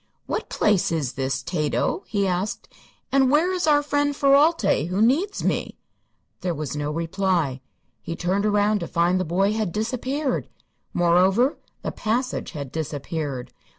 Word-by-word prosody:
"What -, -, -3 dB
place 205 Hz, -5 st, +2 dB
is 150 Hz, -6 st, -1 dB
this, 135 Hz, -1 st, -2 dB
Tato?" 155 Hz, +1 st, -1 dB
he 200 Hz, -2 st, 0 dB
asked; 185 Hz, +2 st, -2 dB, 0.4 s
"and 270 Hz, -1 st, +4 dB
where 320 Hz, +7 st, +3 dB
is 360 Hz, -3 st, -1 dB
our 290 Hz, -1 st, +4 dB
friend 290 Hz, 0 st, 0 dB
Ferralti, 275 Hz, -, +3 dB
who 180 Hz, +3 st, -2 dB
needs 290 Hz, -, +2 dB
me?" -, -, -1 dB, 0.6 s
There 175 Hz, -2 st, -2 dB
was 150 Hz, -1 st, -4 dB
no 145 Hz, 0 st, -2 dB
reply. 165 Hz, -3 st, -1 dB, 0.4 s
He 165 Hz, -, -5 dB
turned 190 Hz, +5 st, 0 dB
around 210 Hz, 0 st, +2 dB
to -, -, -4 dB
find 175 Hz, +2 st, +2 dB
the -, -, +1 dB
boy 195 Hz, +5 st, +1 dB
had 215 Hz, -5 st, -1 dB
disappeared. 255 Hz, -, -2 dB, 0.4 s
Moreover, 185 Hz, -, +3 dB, 0.2 s
the -, -, -2 dB
passage 240 Hz, +1 st, -2 dB
had 140 Hz, -4 st, -6 dB
disappeared. 145 Hz, -3 st, -4 dB
195 Hz, 150 wpm, -24 LUFS, 165-255 Hz, 0.6 s, and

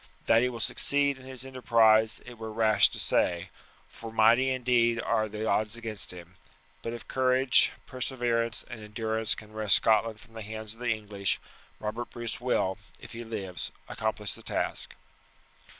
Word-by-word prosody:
That 115 Hz, -, +5 dB
he 125 Hz, -, +2 dB
will 120 Hz, -2 st, -7 dB
succeed 140 Hz, +4 st, +3 dB
in 130 Hz, -, -13 dB
his 130 Hz, -1 st, -5 dB
enterprise 115 Hz, -3 st, +3 dB
it 120 Hz, -2 st, -11 dB
were 110 Hz, 0 st, -6 dB
rash 110 Hz, -1 st, +4 dB
to -, -, -7 dB
say, 85 Hz, -1 st, +1 dB, 0.4 s
for 115 Hz, -1 st, -10 dB
mighty 115 Hz, +4 st, +4 dB
indeed 120 Hz, -2 st, +2 dB
are 110 Hz, -1 st, 0 dB
the 105 Hz, +1 st, -4 dB
odds 110 Hz, 0 st, +1 dB
against 115 Hz, -3 st, -3 dB
him; 90 Hz, 0 st, -12 dB, 0.4 s
but 115 Hz, -, -4 dB
if 120 Hz, -1 st, -8 dB
courage, 130 Hz, 0 st, +3 dB
perseverance, 120 Hz, -2 st, -1 dB
and 120 Hz, -3 st, -8 dB
endurance 110 Hz, +1 st, 0 dB
can 110 Hz, 0 st, -12 dB
wrest 110 Hz, -2 st, +4 dB
Scotland 110 Hz, 0 st, +3 dB
from 115 Hz, 0 st, -17 dB
the 110 Hz, -, -7 dB
hands 110 Hz, 0 st, -6 dB
of 115 Hz, -, -17 dB
the 120 Hz, 0 st, -2 dB
English, 105 Hz, -3 st, -1 dB, 0.4 s
Robert 110 Hz, +3 st, -4 dB
Bruce 120 Hz, 0 st, -5 dB
will, 100 Hz, -6 st, 0 dB, 0.2 s
if -, -, -11 dB
he 115 Hz, +1 st, -6 dB
lives, 100 Hz, -5 st, -5 dB, 0.2 s
accomplish 105 Hz, -2 st, -2 dB
the -, -, -11 dB
task." -, -, -3 dB
115 Hz, 165 wpm, -28 LUFS, 110-120 Hz, 0.4 s, That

